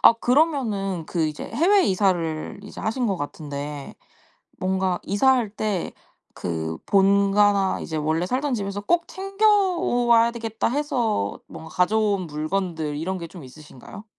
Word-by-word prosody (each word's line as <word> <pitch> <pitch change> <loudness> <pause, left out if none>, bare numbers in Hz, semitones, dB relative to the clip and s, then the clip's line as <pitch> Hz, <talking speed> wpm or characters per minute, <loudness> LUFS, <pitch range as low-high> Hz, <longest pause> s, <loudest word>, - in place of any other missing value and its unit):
아 - - +9
그러면은 230 - +1
그 165 -3 0
이제 150 -1 -5
해외 385 +4 +4
이사를 180 -4 0
이제 205 - -9
하신 235 +3 -1
것 195 - 0
같은데 145 -1 -6 0.6
뭔가 185 -1 0
이사할 240 +2 +2
때 210 -3 -2 0.5
그 80 -2 -3
본가나 200 0 +3
이제 160 - -5
원래 160 +3 0
살던 265 +7 -1
집에서 200 -2 -3
'꼭 340 +10 +1
챙겨와야 370 - +2
되겠다.' 225 -2 -2
해서 245 - -1
뭔가 160 - -10
가져온 200 +1 +1
물건들 155 0 -2
이런 185 +5 -2
게 170 - -6
좀 175 -1 -11
있으신가요? 150 - -12
200 Hz, 285 characters per minute, -24 LUFS, 160-240 Hz, 0.6 s, 아